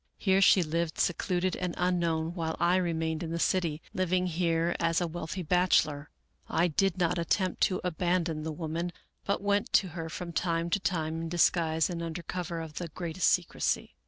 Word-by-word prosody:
Here 195 Hz, -1 st, +3 dB
she 190 Hz, -1 st, +6 dB
lived 165 Hz, +1 st, -2 dB
secluded 180 Hz, +1 st, 0 dB
and 180 Hz, -1 st, -3 dB
unknown 170 Hz, -2 st, 0 dB
while 160 Hz, -2 st, -3 dB
I 175 Hz, +2 st, +3 dB
remained 160 Hz, -3 st, -1 dB
in 165 Hz, -, -4 dB
the 165 Hz, -, -2 dB
city, 165 Hz, -3 st, 0 dB
living 185 Hz, 0 st, +1 dB
here 170 Hz, -1 st, 0 dB
as 165 Hz, 0 st, +2 dB
a 175 Hz, -, 0 dB
wealthy 175 Hz, +2 st, -5 dB
bachelor, 155 Hz, -4 st, +2 dB, 0.2 s
" -, -, -43 dB
I 175 Hz, +2 st, +2 dB
did 190 Hz, +3 st, +1 dB
not 175 Hz, -1 st, +1 dB
attempt 185 Hz, +2 st, 0 dB
to 185 Hz, -, -1 dB
abandon 175 Hz, -2 st, 0 dB
the 160 Hz, +1 st, -3 dB
woman, 165 Hz, +2 st, -3 dB, 0.3 s
but 200 Hz, 0 st, -1 dB
went 205 Hz, +4 st, +1 dB
to 190 Hz, -, +4 dB
her 165 Hz, -1 st, -6 dB
from 170 Hz, +1 st, -6 dB
time 170 Hz, 0 st, 0 dB
to 200 Hz, -, +2 dB
time 165 Hz, -4 st, -1 dB
in 165 Hz, -, -4 dB
disguise 165 Hz, -2 st, +2 dB
and 170 Hz, -2 st, -4 dB
under 165 Hz, +1 st, -5 dB
cover 175 Hz, 0 st, -4 dB
of 160 Hz, -1 st, -7 dB
the 175 Hz, -, -4 dB
greatest 170 Hz, +2 st, -1 dB
secrecy. 175 Hz, -2 st, 0 dB
170 Hz, 190 wpm, -29 LUFS, 160-180 Hz, 0.3 s, she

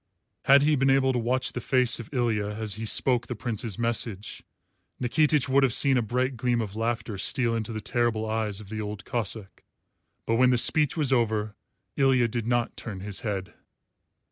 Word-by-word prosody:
Had 140 Hz, +1 st, +6 dB
he 150 Hz, +1 st, +3 dB
been 135 Hz, 0 st, +2 dB
able 135 Hz, -1 st, +3 dB
to 125 Hz, -, 0 dB
watch 125 Hz, +2 st, -1 dB
the 125 Hz, -, -4 dB
face 125 Hz, -1 st, +2 dB
of 115 Hz, -, -9 dB
Ilya 115 Hz, -6 st, 0 dB
as 110 Hz, -2 st, -2 dB
he 110 Hz, +2 st, -5 dB
spoke 120 Hz, +3 st, +2 dB
the 125 Hz, -, -5 dB
Prince's 115 Hz, -3 st, -4 dB
message, 115 Hz, -3 st, -2 dB, 0.6 s
Nikitich 150 Hz, +2 st, +2 dB
would 135 Hz, +1 st, +3 dB
have 130 Hz, -4 st, +3 dB
seen 140 Hz, -1 st, +4 dB
a 125 Hz, -, +2 dB
bright 125 Hz, +3 st, -1 dB
gleam 120 Hz, 0 st, 0 dB
of 105 Hz, -3 st, -4 dB
laughter 115 Hz, -2 st, -3 dB
steal 120 Hz, +1 st, +1 dB
into 115 Hz, 0 st, -4 dB
the 110 Hz, -1 st, -5 dB
terrible 115 Hz, -2 st, -1 dB
eyes 110 Hz, -2 st, -2 dB
of 105 Hz, -3 st, -12 dB
the 110 Hz, 0 st, -4 dB
Old 105 Hz, -1 st, -6 dB
Cossáck. 110 Hz, -3 st, -4 dB, 0.6 s
But 115 Hz, -, 0 dB
when 125 Hz, +1 st, +4 dB
the 125 Hz, -, +3 dB
speech 150 Hz, +5 st, +4 dB
was 145 Hz, -4 st, +1 dB
over, 110 Hz, -3 st, 0 dB, 0.4 s
Ilya 130 Hz, -4 st, +3 dB
did 115 Hz, 0 st, -3 dB
not 120 Hz, -1 st, 0 dB
turn 100 Hz, -5 st, -7 dB
his 100 Hz, 0 st, -4 dB
head. 100 Hz, -5 st, -4 dB
120 Hz, 195 wpm, -26 LUFS, 110-130 Hz, 0.6 s, Had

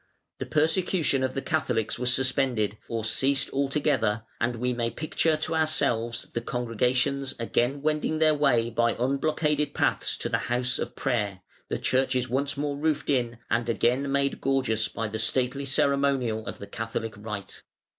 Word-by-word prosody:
The -, -, -4 dB
persecution 160 Hz, -2 st, +1 dB
of 130 Hz, -, -1 dB
the 135 Hz, -, -2 dB
Catholics 125 Hz, -8 st, 0 dB
was 125 Hz, 0 st, +2 dB
suspended, 130 Hz, -5 st, +1 dB
or 115 Hz, -2 st, -2 dB
ceased 135 Hz, +5 st, +1 dB
altogether, 135 Hz, -6 st, +1 dB, 0.2 s
and 120 Hz, +1 st, 0 dB
we 125 Hz, +2 st, -1 dB
may 120 Hz, -1 st, -1 dB
picture 155 Hz, +3 st, 0 dB
to 155 Hz, +1 st, -3 dB
ourselves 120 Hz, -7 st, +1 dB
the 120 Hz, -, -1 dB
congregations 125 Hz, +3 st, 0 dB
again 120 Hz, +4 st, 0 dB
wending 155 Hz, +1 st, 0 dB
their 155 Hz, -1 st, +4 dB
way 125 Hz, -6 st, +2 dB
by 115 Hz, 0 st, +2 dB
unblockaded 150 Hz, +4 st, 0 dB
paths -, -, +1 dB
to -, -, -3 dB
the -, -, 0 dB
house 125 Hz, +1 st, 0 dB
of -, -, -4 dB
prayer, 105 Hz, -8 st, -1 dB, 0.3 s
the -, -, -1 dB
churches 130 Hz, -1 st, +1 dB
once 140 Hz, +3 st, -1 dB
more 145 Hz, 0 st, -2 dB
roofed 150 Hz, -1 st, 0 dB
in 120 Hz, -3 st, 0 dB
and 120 Hz, 0 st, +1 dB
again 125 Hz, +4 st, +1 dB
made 140 Hz, 0 st, 0 dB
gorgeous 130 Hz, -5 st, +1 dB
by 115 Hz, -, -3 dB
the 110 Hz, +1 st, -4 dB
stately 130 Hz, +4 st, +1 dB
ceremonial 135 Hz, -5 st, +1 dB
of -, -, -5 dB
the -, -, -8 dB
Catholic 115 Hz, +1 st, -4 dB
rite. 105 Hz, -2 st, -7 dB
130 Hz, 160 wpm, -27 LUFS, 115-140 Hz, 0.3 s, their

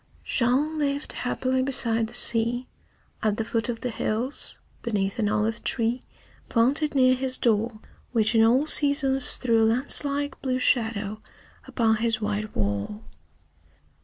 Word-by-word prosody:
Jean 275 Hz, +6 st, 0 dB
lived 285 Hz, -1 st, -2 dB
happily 260 Hz, +1 st, -1 dB
beside 230 Hz, -4 st, 0 dB
the 240 Hz, -, -13 dB
sea, 240 Hz, +1 st, +2 dB, 0.5 s
at 215 Hz, -1 st, 0 dB
the 225 Hz, -, -1 dB
foot 230 Hz, +2 st, -2 dB
of 230 Hz, -1 st, -4 dB
the 250 Hz, -, -3 dB
hills, 235 Hz, +6 st, -3 dB, 0.2 s
beneath 205 Hz, -1 st, -2 dB
an 210 Hz, -2 st, +1 dB
olive 215 Hz, +2 st, -1 dB
tree 235 Hz, +1 st, +1 dB, 0.5 s
planted 280 Hz, +6 st, +3 dB
near 255 Hz, -1 st, +4 dB
his 255 Hz, 0 st, 0 dB
door, 225 Hz, 0 st, +1 dB, 0.4 s
which 225 Hz, -2 st, +2 dB
in 225 Hz, -1 st, +4 dB
all 250 Hz, +6 st, +3 dB
seasons 280 Hz, -3 st, +3 dB
threw 230 Hz, -3 st, +1 dB
a -, -, +4 dB
lance 240 Hz, +7 st, +1 dB
like 285 Hz, -1 st, -3 dB
blue 255 Hz, -2 st, -1 dB
shadow 220 Hz, -4 st, 0 dB, 0.5 s
upon 225 Hz, -2 st, +1 dB
his 225 Hz, 0 st, 0 dB
white 210 Hz, 0 st, -4 dB
wall. 100 Hz, -1 st, -3 dB
235 Hz, 145 wpm, -25 LUFS, 220-260 Hz, 0.5 s, near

